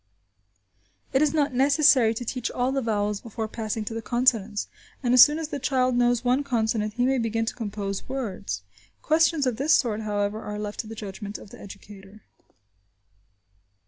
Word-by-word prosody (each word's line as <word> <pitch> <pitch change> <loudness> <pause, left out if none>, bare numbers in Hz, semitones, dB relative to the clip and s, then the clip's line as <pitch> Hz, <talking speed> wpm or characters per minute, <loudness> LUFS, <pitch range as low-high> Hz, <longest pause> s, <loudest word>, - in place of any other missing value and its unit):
It 265 - +3
is 305 -2 +3
not 290 -3 0
necessary 270 -3 +4
to 245 - -5
teach 245 0 -3
all 250 +1 -1
the 270 0 0
vowels 210 -3 -1
before 225 -1 -5
passing 220 -1 -4
to 225 - -5
the 225 - -4
consonants, 225 -3 +1 0.4
and 245 -1 +2
as 250 - +10
soon 295 +1 +3
as 320 -2 -4
the 290 -3 -4
child 255 -2 +1
knows 245 0 +2
one 255 +3 +2
consonant 220 -4 -1
he 245 0 +1
may 265 0 +2
begin 225 0 -1
to - - -3
compose 200 -3 -5
words. 200 - -4 0.4
Questions 320 -2 +3
of 250 -4 -1
this 285 +4 +4
sort, 220 -4 0
however, 205 0 -2
are 210 0 -6
left 210 0 -5
to 220 - -3
the 225 - -8
judgment 205 0 -7
of 205 - -14
the - - -12
educator. 200 +1 -13
230 Hz, 180 wpm, -25 LUFS, 210-260 Hz, 0.4 s, as